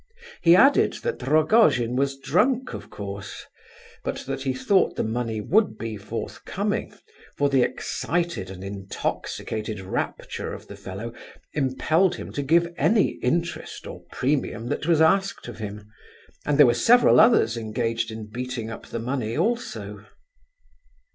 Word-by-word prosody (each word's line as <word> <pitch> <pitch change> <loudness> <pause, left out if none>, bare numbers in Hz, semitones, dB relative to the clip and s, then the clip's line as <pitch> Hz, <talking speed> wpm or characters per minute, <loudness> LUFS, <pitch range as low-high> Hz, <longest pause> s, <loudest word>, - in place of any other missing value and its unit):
He 170 0 +7
added 270 +9 +5
that 480 -1 -2
Rogojin 155 - +3
was 135 +1 0
drunk, 240 - +1
of - - -8
course; 100 -1 -7 0.6
but - - -3
that 135 0 -4
he 135 -1 0
thought 190 +9 +2
the - - -1
money 110 0 -2
would 205 - +2
be 115 -1 -4
forthcoming, 100 - -4 0.5
for 145 0 +2
the 135 -2 +3
excited 170 - -2
and 95 0 -8
intoxicated 100 +2 -4
rapture 95 0 -4
of - - -10
the - - -9
fellow 105 +5 -7 0.4
impelled 155 +6 +2
him - - -8
to 145 - -3
give 170 +4 +2
any 215 -2 +2
interest 170 +6 -2
or - - -8
premium 125 -4 -1
that 150 - -2
was 165 -2 +4
asked 195 +1 +2
of 120 -1 -9
him, 105 -1 -7 0.6
and 145 -1 +2
there 145 - +9
were 120 - +4
several 235 - +5
others 215 - +5
engaged 115 0 -2
in 110 -1 -6
beating 120 0 -5
up - - -9
the - - -5
money, 115 -1 -2
also. 240 +2 -2
130 Hz, 145 wpm, -25 LUFS, 110-170 Hz, 0.6 s, there